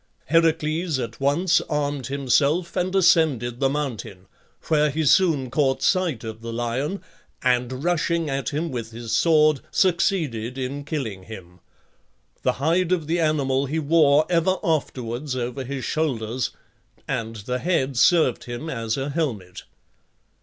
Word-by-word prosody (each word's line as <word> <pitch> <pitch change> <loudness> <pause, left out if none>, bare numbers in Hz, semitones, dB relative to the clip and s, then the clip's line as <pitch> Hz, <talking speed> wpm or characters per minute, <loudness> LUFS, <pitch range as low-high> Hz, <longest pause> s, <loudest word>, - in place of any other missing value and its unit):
Heracles 160 0 +2
at 115 -3 -5
once 155 +6 +2
armed 145 -4 -1
himself 140 +5 +1
and 185 +2 -1
ascended 145 - +3
the 135 -1 +2
mountain, 125 -10 -4 0.4
where 150 -1 +2
he 155 +2 -1
soon 145 -6 +3
caught 135 -3 +1
sight 180 - +1
of 110 0 -7
the 115 0 -6
lion, 120 +10 -2 0.4
and 125 +1 0
rushing 170 -1 0
at 135 -1 -2
him 160 +2 -3
with 115 -3 -4
his 115 0 -7
sword 155 -3 +4
succeeded 155 - 0
in 135 +2 -4
killing 115 -12 -4
him. 90 -4 -11 0.8
The - - +1
hide 170 +5 +1
of 175 -4 +1
the 165 +3 0
animal 140 -4 +1
he 155 +4 -2
wore 155 -1 +4
ever 175 +2 +2
afterwards 130 -4 -2
over 125 +2 -3
his 135 0 -5
shoulders, 125 -6 -1 0.6
and 115 0 -3
the 125 +4 -4
head 140 -5 0
served 155 0 +3
him 120 +7 -5
as 115 -3 -2
a 135 +2 -3
helmet. 115 - -3
140 Hz, 140 wpm, -23 LUFS, 120-160 Hz, 0.8 s, sword